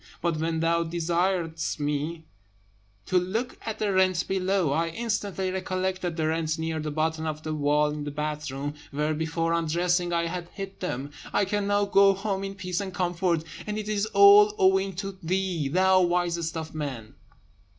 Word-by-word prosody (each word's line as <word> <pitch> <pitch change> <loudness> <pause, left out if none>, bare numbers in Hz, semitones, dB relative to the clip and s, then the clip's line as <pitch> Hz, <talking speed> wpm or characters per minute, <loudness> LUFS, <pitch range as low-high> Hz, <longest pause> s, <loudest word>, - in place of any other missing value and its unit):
But 170 -2 0
when 160 +1 -1
thou 170 0 +2
desiredst 170 0 -1
me 150 +3 -2 0.8
to 185 -1 +3
look 220 +8 -3
at 220 - -4
the 205 -2 0
rent 185 -2 +2
below, 190 -4 +1
I 165 +3 +1
instantly 200 -1 -2
recollected 185 -2 -2
the 160 - 0
rent 160 0 0
near 160 0 -2
the 155 0 -3
bottom 160 +1 -1
of 155 0 -4
the 155 - -3
wall 150 0 +2
in 150 0 -4
the 145 - -4
bathroom, 145 -1 -3 0.2
where, 150 +2 -1
before 165 +1 -1
undressing, 175 +2 +1
I 170 0 +1
had 175 0 -4
hid 195 -1 -7
them. 140 -5 -4 0.2
I 205 - +2
can 205 +1 -1
now 205 0 +2
go 195 0 +5
home 195 0 -2
in 195 0 -5
peace 180 -3 -3
and 195 -1 -4
comfort; 175 -2 0 0.2
and 210 0 -2
it 215 -1 -4
is 215 0 0
all 205 0 +7
owing 190 +1 +3
to 195 0 -5
thee, 180 -3 -1
thou 185 +5 +4
wisest 175 -2 0
of 160 0 -6
men!" 135 -8 -5
175 Hz, 175 wpm, -27 LUFS, 160-190 Hz, 0.8 s, all